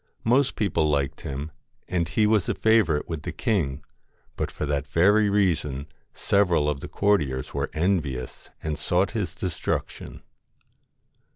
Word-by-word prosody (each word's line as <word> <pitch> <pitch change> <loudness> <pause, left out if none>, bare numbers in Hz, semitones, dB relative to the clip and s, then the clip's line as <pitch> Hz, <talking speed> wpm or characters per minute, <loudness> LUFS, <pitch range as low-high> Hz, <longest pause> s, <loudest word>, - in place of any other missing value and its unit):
Most 130 +4 +3
people 80 -7 +1
liked 70 -2 -1
him, 70 +3 -5 0.4
and 85 -2 -1
he 105 +6 +2
LOCKS 105 - +2
was 105 -5 +2
a - - 0
favourite 110 -10 +3
with 80 -3 -4
the - - -5
king, 75 -10 -1 0.5
but - - -2
for - - -4
that 70 0 -1
very 100 +8 +4
reason 80 -9 +1 0.3
several 90 -7 +2
of 75 -2 -1
the - - -7
courtiers 75 -11 0
were - - -2
envious 75 -8 -2
and 75 -1 -3
sought 90 +2 +1
his 105 -4 -3
destruction. 90 -4 -4
85 Hz, 150 wpm, -25 LUFS, 75-100 Hz, 0.5 s, very